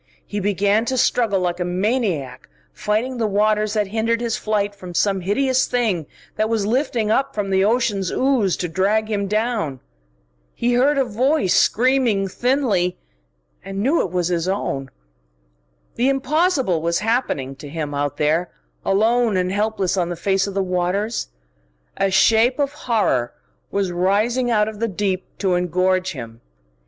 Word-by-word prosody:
He 205 Hz, -, -4 dB
began 205 Hz, +2 st, +1 dB
to 260 Hz, +2 st, -1 dB
struggle 225 Hz, -5 st, +2 dB
like 175 Hz, 0 st, -1 dB
a -, -, 0 dB
maniac, 185 Hz, -, -2 dB, 0.2 s
fighting 215 Hz, +5 st, -1 dB
the 225 Hz, -, +1 dB
waters 210 Hz, +1 st, +1 dB
that 210 Hz, -2 st, +1 dB
hindered 225 Hz, +3 st, 0 dB
his 235 Hz, -2 st, -1 dB
flight 205 Hz, -1 st, -1 dB
from 185 Hz, -3 st, -10 dB
some 195 Hz, 0 st, +1 dB
hideous 260 Hz, +7 st, +1 dB
thing 215 Hz, -, 0 dB, 0.3 s
that 215 Hz, 0 st, +1 dB
was 220 Hz, -3 st, 0 dB
lifting 235 Hz, -2 st, 0 dB
up 275 Hz, +4 st, 0 dB
from 200 Hz, -2 st, -2 dB
the 190 Hz, 0 st, +3 dB
ocean's 205 Hz, -4 st, +1 dB
ooze 255 Hz, -9 st, +1 dB
to 175 Hz, -, -2 dB
drag 205 Hz, +6 st, 0 dB
him 200 Hz, -1 st, -1 dB
down. 210 Hz, -, -1 dB, 0.8 s
He 240 Hz, +1 st, 0 dB
heard 275 Hz, +4 st, +3 dB
a 270 Hz, -, +2 dB
voice 250 Hz, -, +1 dB
screaming 240 Hz, -5 st, +2 dB
thinly, 215 Hz, -6 st, 0 dB, 0.7 s
and 195 Hz, +2 st, -4 dB
knew 290 Hz, +7 st, +3 dB
it -, -, -2 dB
was 180 Hz, 0 st, -1 dB
his 175 Hz, -1 st, -1 dB
own. 140 Hz, -8 st, -2 dB, 1.0 s
The 250 Hz, +3 st, +1 dB
impossible 275 Hz, -, +1 dB
was 170 Hz, +1 st, 0 dB
happening 210 Hz, -, -1 dB
to 145 Hz, -, -9 dB
him, 150 Hz, -1 st, -4 dB
out 145 Hz, 0 st, -2 dB
there, 160 Hz, +4 st, +1 dB, 0.3 s
alone 220 Hz, +1 st, +2 dB
and 180 Hz, 0 st, 0 dB
helpless 205 Hz, -2 st, 0 dB
on 175 Hz, -2 st, 0 dB
the 175 Hz, -, -3 dB
face 195 Hz, +3 st, 0 dB
of 200 Hz, -, -6 dB
the 195 Hz, -, +1 dB
waters. 185 Hz, +5 st, -1 dB, 0.7 s
A 195 Hz, -, +1 dB
shape 225 Hz, +6 st, +4 dB
of 285 Hz, -1 st, 0 dB
horror 205 Hz, -, 0 dB, 0.4 s
was 195 Hz, -2 st, -1 dB
rising 210 Hz, +8 st, +1 dB
out 210 Hz, -2 st, +2 dB
of 215 Hz, -1 st, -6 dB
the 230 Hz, -, 0 dB
deep 190 Hz, -2 st, -2 dB
to 190 Hz, -2 st, 0 dB
engorge 185 Hz, +1 st, +1 dB
him. 115 Hz, -4 st, -9 dB
205 Hz, 160 wpm, -21 LUFS, 185-235 Hz, 1.0 s, shape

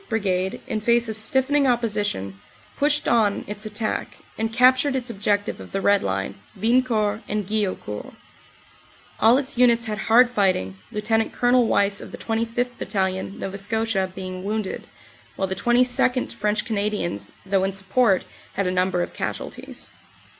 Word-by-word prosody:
Brigade, 190 Hz, -4 st, -1 dB
in 215 Hz, -, -3 dB
face 235 Hz, +1 st, +3 dB
of 220 Hz, -, -3 dB
stiffening 265 Hz, +5 st, +2 dB
opposition, 205 Hz, -, -1 dB, 0.4 s
pushed 295 Hz, +1 st, +1 dB
on 215 Hz, -4 st, +2 dB
its 210 Hz, +1 st, -5 dB
attack, 215 Hz, +1 st, -3 dB, 0.2 s
and 225 Hz, 0 st, -2 dB
captured 255 Hz, +4 st, +4 dB
its 250 Hz, -2 st, -2 dB
objective 205 Hz, 0 st, -1 dB
of -, -, -11 dB
the 195 Hz, -, 0 dB
Red 200 Hz, +1 st, +3 dB
Line, 95 Hz, 0 st, -3 dB, 0.2 s
Wiencourt 220 Hz, -2 st, +2 dB
and 210 Hz, -1 st, -1 dB
Guillaucourt. 195 Hz, -, -3 dB, 1.0 s
All 230 Hz, +3 st, +6 dB
its 270 Hz, -3 st, -2 dB
units 235 Hz, -2 st, +4 dB
had 215 Hz, -1 st, -3 dB
hard 240 Hz, +3 st, +5 dB
fighting, 185 Hz, -, +1 dB, 0.2 s
Lt. 220 Hz, +1 st, 0 dB
Col. 245 Hz, -1 st, +3 dB
Wyse 200 Hz, -1 st, +2 dB
of -, -, -9 dB
the -, -, -7 dB
25th. 230 Hz, +2 st, -2 dB
Battalion, 190 Hz, -1 st, -2 dB
Nova 195 Hz, +1 st, -5 dB
Scotia, 210 Hz, -2 st, -1 dB
being 185 Hz, -1 st, -6 dB
wounded, 210 Hz, 0 st, -3 dB, 0.5 s
while 190 Hz, -, -1 dB
the 190 Hz, -, -2 dB
22nd., 245 Hz, +4 st, +2 dB
French 210 Hz, +1 st, -1 dB
Canadians, 205 Hz, -, -2 dB
though 190 Hz, 0 st, +1 dB
in 195 Hz, -, 0 dB
support, 195 Hz, +1 st, +2 dB, 0.3 s
had 200 Hz, -, -1 dB
a 180 Hz, -, +1 dB
number 180 Hz, -1 st, +1 dB
of -, -, -7 dB
casualties. -, -, -6 dB
215 Hz, 150 wpm, -23 LUFS, 195-235 Hz, 1.0 s, All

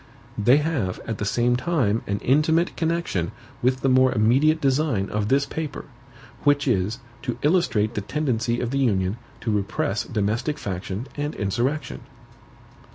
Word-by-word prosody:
They 120 Hz, +6 st, +5 dB
have, 150 Hz, -, -1 dB
at 115 Hz, -2 st, -4 dB
the 105 Hz, -, -1 dB
same 120 Hz, +3 st, +2 dB
time, 125 Hz, -6 st, +1 dB
an 100 Hz, -, 0 dB
intimate 160 Hz, +6 st, +2 dB
connection 165 Hz, -, -1 dB, 0.3 s
with 130 Hz, +1 st, +1 dB
the -, -, +1 dB
more 130 Hz, 0 st, +5 dB
immediate 130 Hz, +8 st, +3 dB
design 135 Hz, -8 st, +1 dB
of 105 Hz, -1 st, -1 dB
this 135 Hz, +4 st, +3 dB
paper; 155 Hz, 0 st, -5 dB, 0.6 s
which 145 Hz, 0 st, +3 dB
is, 105 Hz, -1 st, +1 dB, 0.2 s
to 120 Hz, -2 st, -3 dB
illustrate 145 Hz, -, +2 dB
the 105 Hz, -, -2 dB
tendency 120 Hz, -2 st, -1 dB
of 120 Hz, -1 st, -2 dB
the 135 Hz, -, 0 dB
Union 100 Hz, -5 st, +1 dB, 0.2 s
to 115 Hz, -, -1 dB
repress 100 Hz, 0 st, -1 dB
domestic 110 Hz, +7 st, -1 dB
faction 95 Hz, +3 st, -4 dB
and 145 Hz, +1 st, -2 dB
insurrection. 125 Hz, +9 st, -2 dB
125 Hz, 150 wpm, -24 LUFS, 105-145 Hz, 0.6 s, They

